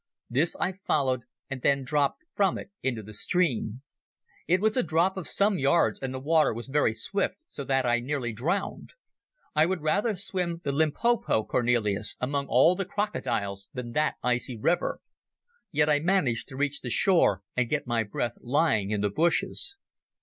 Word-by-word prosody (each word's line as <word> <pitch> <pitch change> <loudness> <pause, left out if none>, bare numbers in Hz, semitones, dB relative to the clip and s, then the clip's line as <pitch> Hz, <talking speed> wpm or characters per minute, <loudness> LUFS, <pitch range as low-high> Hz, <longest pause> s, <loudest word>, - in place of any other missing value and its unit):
This 150 +8 +2
I - - +1
followed, 140 -9 0 0.3
and 135 -2 -6
then 140 +1 +2
dropped 145 - 0
from 195 -3 +2
it 195 - -9
into 120 -5 -2
the 105 +2 -11
stream. 125 - 0 0.6
It 180 +2 +3
was 215 +2 +1
a 255 - +3
drop 175 +2 +1
of 190 -4 -5
some 200 -2 +2
yards, 155 +5 +2
and 135 -1 -4
the 130 - -4
water 155 -2 +2
was 120 +3 -6
very 145 -4 +2
swift, 195 - -2
so 145 - -6
that 135 -1 +1
I 120 0 +2
nearly 125 -2 -3
drowned. 170 - -2 0.6
I 155 +2 +5
would 185 -2 -2
rather 205 +8 +1
swim 180 -3 -3
the 140 - -1
Limpopo, 160 - +1
Cornelis, 110 -4 +1
among 140 +2 -1
all 135 +8 +5
the 195 - -1
crocodiles 105 - -3
than 125 -2 -5
that 150 +5 +1
icy 125 0 0
river. 165 +11 0 0.7
Yet 150 0 +2
I 150 -1 +3
managed 155 -9 +1
to 130 - -10
reach 145 +1 -1
the 125 - -5
shore 120 - +3
and 125 -2 +1
get 150 -1 -1
my 120 -2 +1
breath 115 +2 -3
lying 125 -6 +1
in 105 -1 -1
the 105 -1 0
bushes 170 - 0
140 Hz, 175 wpm, -27 LUFS, 120-175 Hz, 0.7 s, I